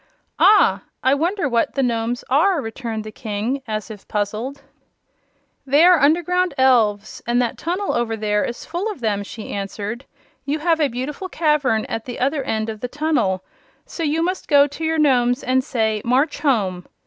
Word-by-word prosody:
"Ah; 420 0 +5 0.2
I 260 - +4
wonder 335 +4 0
what 235 -3 0
the 275 - +1
Nomes 235 0 -1
are!" 330 +6 +3
returned 225 -2 -5
the 215 - -8
King, 220 +5 -3
as 215 0 -4
if 205 -2 -11
puzzled. 215 +7 -3 1.0
"They 285 +5 +4
are 360 -2 +6
underground 350 +3 +2
elves, 220 -6 +2
and 240 +1 +2
that 245 -2 -1
tunnel 365 +5 -2
over 230 -2 -1
there 210 -1 0
is 240 - -5
full 350 +6 -3
of 385 - -10
them," 210 -3 0
she 210 +2 -8
answered. 205 +5 -5 0.4
"You 290 +2 -1
have 325 +1 +1
a 300 - +3
beautiful 275 +9 -5
cavern 295 -10 +1
at 225 - -5
the 245 - -6
other 275 +3 0
end 220 -4 -2
of 220 -1 -5
the 250 - -3
tunnel, 285 -10 0 0.4
so - - -8
you 320 +1 +1
must 370 +2 -2
go 285 -1 +6
to 290 +3 -7
your 320 0 0
Nomes 250 -4 +2
and 260 +1 +1
say: 220 -4 -1
'March 270 +5 +1
home!' 205 - 0
255 Hz, 180 wpm, -21 LUFS, 220-300 Hz, 1.0 s, are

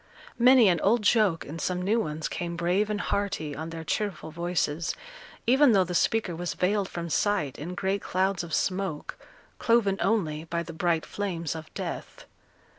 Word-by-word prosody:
Many 250 -1 +7
an 175 -3 +3
old 220 +2 +3
joke, 205 -6 +3
and 160 +4 -7
some 180 -1 -1
new 205 +6 +1
ones, 155 -5 -2
came 170 -1 -4
brave 180 +5 +1
and 210 -1 -1
hearty, 185 -9 -2
on 160 +3 -5
their 165 0 -6
cheerful 185 -2 -3
voices, 170 -1 -1 0.5
even 265 +1 +5
though 195 -2 +5
the 180 0 -5
speaker 195 0 +1
was 175 +1 -3
veiled 195 +1 +1
from 170 -1 -5
sight 170 -5 0
in 170 +5 -5
great 195 +1 -1
clouds 190 0 0
of 170 - -8
smoke, 185 -3 -1 0.4
cloven 225 -5 +2
only 165 -6 0
by 170 +1 -2
the 165 - -8
bright 165 -1 0
flames 175 -6 -3
of 160 -1 -8
death. - - -6
180 Hz, 175 wpm, -27 LUFS, 165-205 Hz, 0.5 s, Many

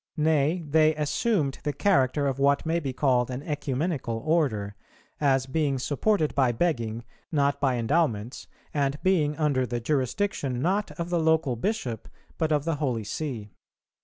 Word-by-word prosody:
Nay, 155 +2 +2
they 155 +1 +4
assumed 150 - 0
the 145 - -1
character 145 -8 +2
of 135 -1 -1
what 140 +2 +3
may 165 +1 +1
be 140 -5 -3
called 130 -2 +1
an 130 +2 -5
Ecumenical 145 -4 -2
Order, 120 -12 0 0.4
as 135 -3 +2
being 140 0 0
supported 155 +5 0
by 130 -3 +3
begging, 115 -5 -1 0.3
not 140 -2 +1
by 135 -3 +2
endowments, 120 -3 0 0.3
and 140 -1 0
being 155 -6 +2
under 145 -5 +1
the 120 +1 -2
jurisdiction, 135 - -1
not 195 +8 0
of 170 +1 -3
the 175 - +2
local 160 -5 +2
Bishop, 120 - -3 0.3
but 160 -1 +1
of 150 -1 +1
the 165 -2 0
Holy 125 -7 -1
See. 110 -2 -5
145 Hz, 155 wpm, -26 LUFS, 130-160 Hz, 0.4 s, they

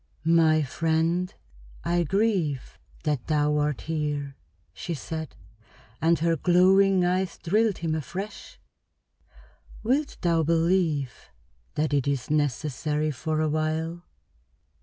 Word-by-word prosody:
"My 160 -1 +4
friend, 165 +5 0 0.5
I 175 +1 +1
grieve 180 - 0 0.2
that 150 -5 -1
thou 150 -1 +2
art 150 -2 -1
here," 150 -3 -3 0.4
she 170 - -4
said, 160 +2 -6 0.7
and 165 +1 +4
her 165 +1 +1
glowing 185 +3 +4
eyes 185 +1 0
thrilled 210 +4 +1
him 165 -2 -2
afresh. 180 +7 -6 1.2
"Wilt 275 +6 0
thou 170 -2 +2
believe 165 -4 0 0.5
that 150 0 0
it 140 -1 +1
is 140 -1 -1
necessary 150 +1 0
for 155 +3 -2
a 155 - +1
while?" 160 +2 -1
160 Hz, 110 wpm, -26 LUFS, 150-175 Hz, 1.2 s, My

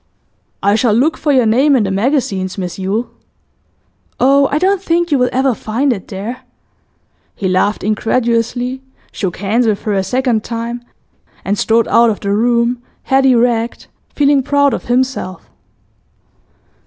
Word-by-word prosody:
'I 200 +1 +3
shall 225 -1 +2
look 285 +8 +2
for 300 - -1
your 255 -4 +3
name 265 +6 +3
in 240 - +2
the 195 - -2
magazines, 195 -4 -1
Miss 180 -1 -5
Yule.' 215 +5 -2 1.1
'Oh, 275 +2 +4
I 290 - +1
don't 380 +3 +1
think 345 -2 0
you 285 - +3
will 250 0 +2
ever 265 0 +1
find 245 +5 -1
it 195 -5 -9
there.' 210 +6 -6 0.9
He 195 - -3
laughed 185 +3 0
incredulously, 235 +4 -1 0.3
shook 185 -4 -4
hands 220 +5 0
with 210 -2 -1
her 210 - -1
a 195 -1 0
second 240 +1 0
time, 235 +1 -5 0.6
and 200 - 0
strode 225 +2 +1
out 235 0 +4
of 210 - -2
the 200 - -3
room, 235 +3 +1 0.2
head 270 0 +2
erect 235 -2 +1 0.3
feeling 285 -1 +3
proud 285 +1 +2
of - - -4
himself. 245 -6 -2
235 Hz, 155 wpm, -15 LUFS, 210-265 Hz, 1.1 s, Oh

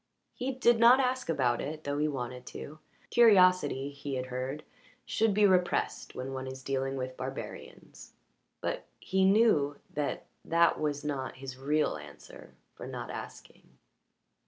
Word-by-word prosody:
He 255 +2 -3
did 240 -3 +3
not 240 +3 +7
ask 255 -5 0
about 125 -6 +1
it, 155 +2 -5
though 145 0 -2
he 150 - +2
wanted 125 -3 -5
to; 155 +2 -8 0.3
curiosity, 185 - +5
he 140 -1 -5
had 130 0 -2
heard, 130 +4 -4 0.4
should 220 0 +1
be 205 +1 +4
repressed 180 -2 +1
when 130 +1 -5
one 130 0 -5
is 130 0 -8
dealing 135 0 -2
with 130 0 -4
barbarians. 130 +1 -8 0.5
But - - -3
he 190 0 +1
knew 190 -9 +4 0.2
that 145 -1 -2 0.2
that 170 +1 +3
was 145 -1 -2
not 135 -3 -3
his 130 -1 -8
real 145 - 0
reason 70 -5 -13 0.2
for - - -9
not - - -6
asking. - - -10
145 Hz, 150 wpm, -30 LUFS, 130-185 Hz, 0.5 s, not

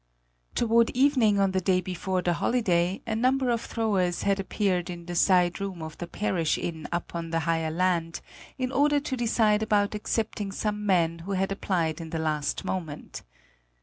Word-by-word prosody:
Toward 230 0 +3
evening 250 -6 +4
on 195 -1 +3
the 190 0 0
day 185 0 +2
before 185 0 -2
the 175 - +2
holiday 180 -3 +1
a 220 - -2
number 255 +2 +2
of 230 -1 0
throwers 195 -6 0
had 200 0 +1
appeared 190 -2 -1
in 170 -1 -7
the 175 - -5
side 180 +1 +3
room 190 -4 -4
of 160 -1 -7
the 175 - -5
parish 175 -5 0
inn 160 -3 -4
up 175 0 -3
on 170 -1 -4
the 165 0 0
higher 165 0 0
land, 170 0 0 0.4
in 255 -1 -2
order 290 +1 +3
to 280 -2 -3
decide 220 -3 +2
about 210 -2 +2
accepting 210 -1 -2
some 210 +1 -2
men 170 -3 +2
who 190 +4 -5
had 195 +1 0
applied 170 -5 -1
in 165 - -7
the 165 - -3
last 155 -2 -1
moment. 160 -6 -5
190 Hz, 180 wpm, -27 LUFS, 170-215 Hz, 0.4 s, evening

